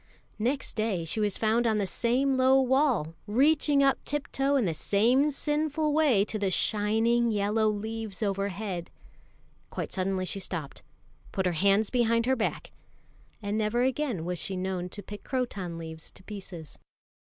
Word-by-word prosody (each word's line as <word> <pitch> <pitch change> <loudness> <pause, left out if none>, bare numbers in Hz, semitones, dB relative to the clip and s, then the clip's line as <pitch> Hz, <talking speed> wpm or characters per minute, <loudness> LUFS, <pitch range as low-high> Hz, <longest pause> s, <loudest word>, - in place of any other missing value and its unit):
Next 255 +6 -1
day 215 -6 -1
she 165 - -2
was 210 -2 +1
found 230 +2 +2
on 220 -1 +2
the 205 - +1
same 255 +7 +1
low 260 +1 +5
wall, 265 - +2
reaching 285 +5 +3
up 275 -1 +2
tiptoe 285 -1 -1
in 260 -6 +2
the 170 - 0
same 235 - +3
sinful 300 +1 0
way 280 -10 +4
to 215 - -4
the 200 -1 +1
shining 220 +5 +2
yellow 215 +1 +1
leaves 220 0 -4
overhead. 195 -2 -2 0.8
Quite - - -5
suddenly 185 -1 -1
she 195 - -4
stopped, 165 -7 -6 0.5
put 190 - -1
her 180 - +2
hands 200 +5 +2
behind 230 -2 +2
her 260 +1 +3
back, 230 - -3 0.7
and 205 +2 -1
never 220 +3 +1
again 260 - -1
was 180 -1 -3
she 190 - -3
known 185 -1 -3
to 205 +2 -8
pick 205 +2 -9
croton 200 -10 -3
leaves 160 -1 -7
to - - -15
pieces. 185 -6 -9
215 Hz, 160 wpm, -28 LUFS, 195-255 Hz, 0.8 s, low